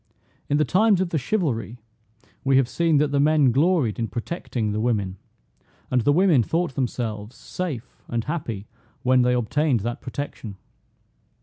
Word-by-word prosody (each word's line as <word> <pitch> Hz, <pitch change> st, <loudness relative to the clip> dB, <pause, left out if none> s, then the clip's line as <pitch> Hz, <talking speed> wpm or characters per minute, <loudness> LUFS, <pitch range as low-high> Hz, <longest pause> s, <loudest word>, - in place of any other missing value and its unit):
In 145 Hz, -, +2 dB
the 150 Hz, -, +3 dB
times 200 Hz, +4 st, +3 dB
of 185 Hz, -2 st, 0 dB
the 160 Hz, -, 0 dB
chivalry, 125 Hz, -, -1 dB, 0.7 s
we 135 Hz, -1 st, +3 dB
have 135 Hz, -2 st, +3 dB
seen 165 Hz, +3 st, +2 dB
that 145 Hz, 0 st, +2 dB
the 140 Hz, -, +1 dB
men 150 Hz, -2 st, +4 dB
gloried 140 Hz, -, +2 dB
in 115 Hz, -, 0 dB
protecting 120 Hz, -, -3 dB
the 105 Hz, -, -2 dB
women, 105 Hz, -5 st, -1 dB, 0.7 s
and 125 Hz, -1 st, +3 dB
the 145 Hz, -, +3 dB
women 170 Hz, -4 st, +4 dB
thought 165 Hz, +6 st, -1 dB
themselves 115 Hz, -3 st, -3 dB
safe 140 Hz, -10 st, -6 dB
and 115 Hz, -1 st, -2 dB
happy 115 Hz, -, -4 dB, 0.4 s
when 130 Hz, 0 st, +4 dB
they 125 Hz, 0 st, +3 dB
obtained 125 Hz, +1 st, +1 dB
that 120 Hz, +3 st, -4 dB
protection. 115 Hz, -8 st, -6 dB
130 Hz, 160 wpm, -24 LUFS, 115-155 Hz, 0.7 s, men